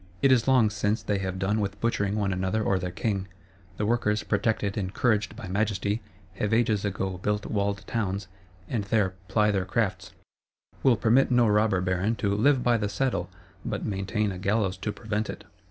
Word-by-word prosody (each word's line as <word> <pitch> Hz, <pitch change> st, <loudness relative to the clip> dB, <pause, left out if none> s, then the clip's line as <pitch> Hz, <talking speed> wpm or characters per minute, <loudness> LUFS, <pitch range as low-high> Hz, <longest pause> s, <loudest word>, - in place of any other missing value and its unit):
It 135 Hz, -, +6 dB
is 130 Hz, -1 st, +4 dB
long 125 Hz, -5 st, +4 dB
since 105 Hz, +1 st, -1 dB
they 105 Hz, -2 st, 0 dB
have 95 Hz, -1 st, -3 dB
done 100 Hz, +3 st, 0 dB
with 100 Hz, -2 st, -3 dB
butchering 100 Hz, -3 st, 0 dB
one 100 Hz, -2 st, 0 dB
another 95 Hz, +4 st, 0 dB
or 100 Hz, -2 st, +1 dB
their 90 Hz, 0 st, -3 dB
king: 95 Hz, +1 st, -2 dB, 0.5 s
the 105 Hz, -, 0 dB
Workers, 105 Hz, -2 st, +1 dB
protected, 105 Hz, -1 st, 0 dB
encouraged 105 Hz, +2 st, 0 dB
by 110 Hz, -4 st, -8 dB
Majesty, 100 Hz, +2 st, 0 dB, 0.4 s
have 105 Hz, +1 st, +1 dB
ages 110 Hz, -3 st, +2 dB
ago 95 Hz, -2 st, -2 dB
built 105 Hz, +2 st, -1 dB
walled 100 Hz, -1 st, -1 dB
towns, 100 Hz, -4 st, -2 dB, 0.4 s
and 110 Hz, -1 st, -1 dB
there 100 Hz, -2 st, +1 dB
ply 105 Hz, +2 st, +3 dB
their 95 Hz, -2 st, 0 dB
crafts; 95 Hz, -2 st, -2 dB, 0.7 s
will 125 Hz, -4 st, +4 dB
permit 120 Hz, +6 st, +4 dB
no 120 Hz, -2 st, +4 dB
Robber 105 Hz, -2 st, +3 dB
Baron 90 Hz, +5 st, 0 dB
to 100 Hz, -2 st, 0 dB
"live 125 Hz, +5 st, +3 dB
by 120 Hz, -1 st, +3 dB
the 105 Hz, -2 st, -1 dB
saddle," 130 Hz, +5 st, -1 dB, 0.3 s
but -, -, -3 dB
maintain 100 Hz, +1 st, -1 dB
a 90 Hz, -, -6 dB
gallows 100 Hz, -1 st, +1 dB
to 105 Hz, +3 st, -3 dB
prevent 105 Hz, 0 st, -3 dB
it. -, -, -6 dB
105 Hz, 185 wpm, -27 LUFS, 95-110 Hz, 0.7 s, It